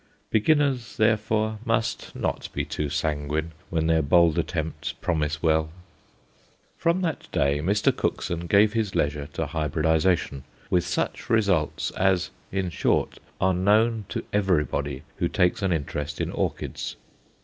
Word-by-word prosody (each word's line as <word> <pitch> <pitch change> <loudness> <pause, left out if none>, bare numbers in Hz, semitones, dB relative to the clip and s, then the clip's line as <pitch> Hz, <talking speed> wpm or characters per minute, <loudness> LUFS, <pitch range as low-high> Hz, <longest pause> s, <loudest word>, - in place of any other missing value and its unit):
Beginners, 130 0 +2
therefore, 110 0 +1
must 115 -2 -1
not - - -2
be - - -1
too 75 -1 -3
sanguine 75 +2 -1 0.2
when 80 -1 0
their 80 0 +3
bold 85 +2 +4
attempts 80 -2 -3
promise 75 -3 -2
well. 80 -1 +2 1.1
From 170 +2 +1
that 165 -5 -3
day 70 +1 +2
Mr. 100 +7 +2
Cookson 85 0 -2
gave 105 +5 +5
his 110 -4 -1
leisure 75 0 0
to - - -1
hybridization, 80 -1 +1 0.3
with 90 -1 +2
such 85 - -2
results 100 -9 +1
as, 95 -1 +1 0.2
in 95 -2 -1
short, - - 0 0.2
are 95 0 +3
known 105 +4 +3
to - - -3
everybody 75 -8 0
who - - +1
takes 90 +5 +1
an 95 -2 +1
interest 75 -1 -3
in - - -1
orchids. - - -3
90 Hz, 135 wpm, -25 LUFS, 75-105 Hz, 1.1 s, gave